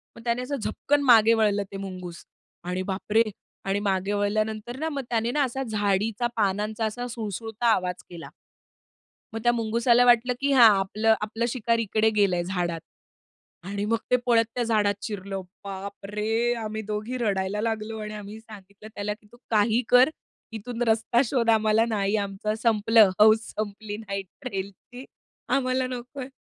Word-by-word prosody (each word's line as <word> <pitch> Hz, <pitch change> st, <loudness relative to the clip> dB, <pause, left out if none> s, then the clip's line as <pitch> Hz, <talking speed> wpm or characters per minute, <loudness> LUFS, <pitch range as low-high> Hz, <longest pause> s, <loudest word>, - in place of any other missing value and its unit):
मग 230 Hz, -, -13 dB
त्याने 235 Hz, +1 st, 0 dB
असं 255 Hz, +3 st, -3 dB
झपकन 285 Hz, +3 st, 0 dB
मागे 230 Hz, -4 st, +6 dB
वळलं 210 Hz, -2 st, +2 dB
ते 195 Hz, -, -6 dB
मुंगूस 185 Hz, -3 st, -7 dB, 0.4 s
आणि 180 Hz, +1 st, -3 dB
बाप 190 Hz, +2 st, -5 dB
रे! 225 Hz, +1 st, +6 dB, 0.4 s
आणि 195 Hz, +1 st, 0 dB
मागे 195 Hz, -1 st, -1 dB
वळल्यानंतर 215 Hz, +3 st, -1 dB
ना 320 Hz, +1 st, -1 dB
मग 285 Hz, -3 st, -3 dB
त्याने 230 Hz, 0 st, 0 dB
ना 290 Hz, +2 st, +2 dB
असा 265 Hz, +1 st, -2 dB
झाडीचा 210 Hz, 0 st, 0 dB
पानांचा 210 Hz, +2 st, 0 dB
असा 245 Hz, +3 st, -4 dB
सुळसुळता 225 Hz, 0 st, -4 dB
आवाज 180 Hz, -4 st, -1 dB
केला. 170 Hz, -2 st, -9 dB, 1.0 s
मग 225 Hz, -, -3 dB
त्या 240 Hz, -, +5 dB
मुंगुसाला 235 Hz, +1 st, +3 dB
वाटलं 245 Hz, +1 st, +4 dB
की 280 Hz, 0 st, +1 dB
हा 250 Hz, -3 st, +8 dB
आपलं 215 Hz, +3 st, +2 dB
आपलं 225 Hz, +2 st, -2 dB
शिकार 230 Hz, -1 st, 0 dB
इकडे 220 Hz, 0 st, +2 dB
गेलंय 190 Hz, -4 st, +2 dB
झाडात 175 Hz, -2 st, -2 dB, 0.9 s
आणि 200 Hz, +1 st, -3 dB
मग 230 Hz, +2 st, +1 dB
ते -, -, +6 dB
पळत 230 Hz, -2 st, +4 dB
त्या 245 Hz, -, 0 dB
झाडात 215 Hz, -3 st, +2 dB
शिरलं, 195 Hz, -2 st, -5 dB, 0.2 s
बाप 200 Hz, 0 st, -7 dB
रे! 220 Hz, +4 st, 0 dB
आम्ही 220 Hz, -1 st, -4 dB
दोघी 215 Hz, +4 st, -4 dB
रडायला 205 Hz, -3 st, -1 dB
लागलो 220 Hz, -1 st, -3 dB
आणि 210 Hz, 0 st, -6 dB
आम्ही 210 Hz, +1 st, -8 dB
सांगितलं 210 Hz, -2 st, -14 dB
त्याला 205 Hz, +1 st, -2 dB
की 210 Hz, 0 st, -20 dB
"तू 240 Hz, -, -16 dB
काही 220 Hz, +2 st, +3 dB
कर, 250 Hz, +2 st, +6 dB, 0.4 s
इथून 230 Hz, +2 st, -6 dB
रस्ता 225 Hz, +2 st, +2 dB
शोध, 235 Hz, -1 st, 0 dB
आम्हाला 220 Hz, 0 st, +3 dB
नाही, 205 Hz, -1 st, 0 dB
आमचं 200 Hz, +1 st, -2 dB
संपलं, 225 Hz, -2 st, +5 dB
हौस 220 Hz, +1 st, +6 dB
संपली, 210 Hz, 0 st, -5 dB
नाईट 195 Hz, -3 st, -5 dB
ट्रेलची, 235 Hz, +2 st, -7 dB, 0.5 s
आम्हाला 255 Hz, -1 st, 0 dB
नकोय." 255 Hz, +1 st, -7 dB
215 Hz, 160 wpm, -25 LUFS, 200-235 Hz, 1.0 s, हा